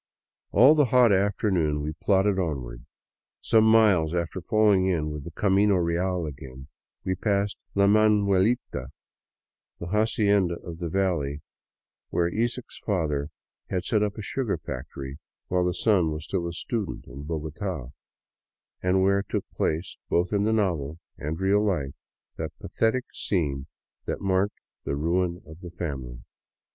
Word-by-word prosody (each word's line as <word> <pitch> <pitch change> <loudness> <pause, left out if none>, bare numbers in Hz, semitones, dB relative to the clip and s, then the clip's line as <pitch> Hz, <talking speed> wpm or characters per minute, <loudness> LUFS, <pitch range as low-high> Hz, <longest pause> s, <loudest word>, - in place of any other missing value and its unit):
All 130 +8 +7
the 150 -2 +4
hot 125 -2 +5
afternoon 95 -6 +1
we 75 +1 -3
plodded 95 +4 +2
onward. 65 -8 -4 0.5
Some 110 -1 +4
miles 105 -8 +4
after 85 +2 -2
falling 100 -1 +3
in 80 -5 0
with 75 -2 -6
the - - -5
camino 100 +3 +3
real 90 0 0
again, 65 -1 -9 0.4
we 95 - +1
passed 100 +1 0
" - - -39
La 100 0 +4
Manuelita," 105 - +3 0.9
the - - -5
" - - -5
haci 110 0 +2
enda 100 -4 +3
of 85 -1 -7
the 85 -2 -3
valley 80 -6 -1 0.3
" - - -67
where 85 0 0
Isaacs' 120 +2 -3
father 75 -8 -1 0.4
had 90 -2 -2
set 105 +2 +2
up 105 -1 -1
a 110 - -5
sugar 120 -1 -1
factory 65 +2 -7 0.3
while 90 0 +2
the 90 - +2
son 95 -7 +3
was 75 0 -4
still 85 +1 -2
a 85 - -4
student 105 +3 -4
in 70 +1 -9
Bogota, 80 - -4 0.9
and 95 +1 +2
where 100 +1 +3
took - - -3
place, 80 +4 -2
both 90 +3 +1
in 100 0 +2
the 110 - +2
novel 85 -9 0 0.2
and 80 +3 -4
real 100 +2 +3
life, 75 -10 -1 0.4
that - - -5
pathetic 120 +3 0
scene 70 -7 -1 0.4
that - - -2
marked 95 +1 0 0.3
the 70 - -2
ruin 85 +3 0
of 80 +1 -12
the 90 -2 -8
family. 65 -8 -6
90 Hz, 155 wpm, -26 LUFS, 80-100 Hz, 0.9 s, All